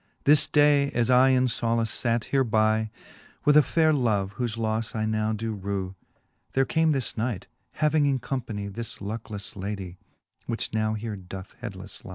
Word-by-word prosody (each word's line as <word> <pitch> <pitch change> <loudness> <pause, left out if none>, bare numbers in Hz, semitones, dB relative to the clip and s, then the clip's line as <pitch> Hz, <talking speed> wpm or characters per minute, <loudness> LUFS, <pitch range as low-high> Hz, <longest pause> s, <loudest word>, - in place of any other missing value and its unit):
This 145 +1 +5
day 145 -1 +4
as 120 +1 +2
I 130 +1 +6
in 130 -1 +4
folace 115 -2 0
fate 115 -2 +1
hereby 110 -4 +2 0.6
With 150 - +5
a 150 - +9
fayre 160 +1 +2
love, 105 -8 +1
whofe 120 -2 -2
lofTe 110 0 -2
I 110 -1 0
now 110 0 0
do 110 +1 -3
rew. 95 -2 -3 0.6
There 135 0 +3
came 160 +3 +2
this 135 -4 -1
knight, 110 -4 -2 0.3
having 150 -1 +2
in 135 -1 +2
companie 115 -6 -4
This 115 0 -5
lucklelTe 105 -1 -5
ladie, 95 -2 -5 0.5
which 115 -2 -3
now 110 0 0
here 110 0 -4
doth 95 +1 -9
headlelTe 100 -4 -7
lie. - - -8
115 Hz, 170 wpm, -26 LUFS, 105-130 Hz, 0.6 s, a